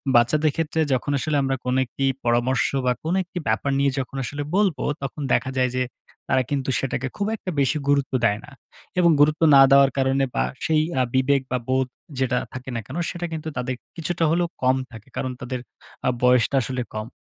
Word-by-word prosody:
বাচ্চাদের 150 +6 +4
ক্ষেত্রে 160 0 -1
যখন 130 +3 -1
আসলে 150 0 0
আমরা 135 0 0
কোনো 125 +1 +1
একটি 135 +3 -3 0.2
পরামর্শ 120 +2 +2 0.2
বা, 125 - +3
কোনো 165 +4 0
একটি 180 0 -10
ব্যাপার 115 +6 +1
নিয়ে 140 0 +3
যখন 135 +1 -5
আসলে 145 +4 -4
বলবো, 195 -6 +2 0.2
তখন 140 +2 -5
দেখা 130 - +1
যায় 125 -1 +2
যে, 130 - +2 0.4
তারা 130 -1 +2
কিন্তু 135 -2 -1
সেটাকে 135 0 -2
খুব 200 - -1
একটা 185 - -5
বেশি 140 +3 +2
গুরুত্ব 140 -1 +2
দেয় 105 -1 +2
না 150 - -15 0.5
এবং 170 -2 +5
গুরুত্ব 150 +2 +4
না 135 - +9
দেওয়ার 140 0 +6
কারণে 135 0 +2
বা, - - +2 0.2
সেই 155 -1 +3 0.2
আ - - +4
বিবেক 135 +1 +3
বা, 125 - +2
বোধ 130 0 +2 0.3
যেটা 125 -1 +1 0.2
থাকে 130 0 -7
না - - -1
কেন, 140 +6 -6
সেটা 175 -1 -4
কিন্তু 160 0 -5
তাদের 125 +1 -2 0.2
কিছুটা 170 +1 -1
হলেও 175 +1 +2 0.2
কম 130 +1 +4 0.2
থাকে। 110 +1 -12
কারণ, 130 - -2
তাদের 125 0 -4 0.5
আ - - +5
বয়সটা 125 +1 +4
আসলে 130 +1 -3
কম। 110 +1 -4
135 Hz, 200 wpm, -23 LUFS, 125-150 Hz, 0.5 s, না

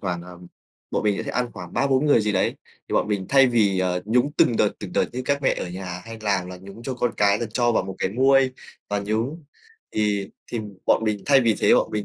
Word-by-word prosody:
khoảng, 90 -3 -3
ờ 90 0 -12 0.5
bọn - - -1
mình 105 -2 0
sẽ - - -3
ăn 125 -1 -1
khoảng 90 -4 -9
3-4 135 +1 +2
người 145 - +5
gì 105 -1 0
đấy, 95 - +1 0.3
thì - - -6
bọn - - +1
mình 100 -3 -1
thay 135 -1 +6
vì, 105 -6 +2
ờ, 90 -1 0
nhúng 125 +6 +2
từng 115 - +4
đợt, 105 - +3
từng 95 -4 -7
đợt - - +2
như 125 +1 -4
các 140 +1 0
mẹ - - +3
ở - - -4
nhà 90 0 -6
hay 115 0 -9
làm 100 -4 0
là 90 - -7
nhúng 100 +4 -12
cho 130 +2 -4
con 120 -1 0
cái 100 0 +3
là 120 - -2
cho 120 -1 +2
vào - - +2
một 95 - -6
cái - - 0
muôi 135 +3 +4 0.4
và 105 0 0
nhúng, 115 +10 -2 0.5
thì 105 -1 0 0.2
thì 120 - -4 0.3
bọn - - +3
mình 105 -2 -1
thay 140 -2 +6
vì 115 -3 +3
thế - - +5
bọn - - +2
mình 105 -1 -2
105 Hz, 255 wpm, -23 LUFS, 95-125 Hz, 0.5 s, thay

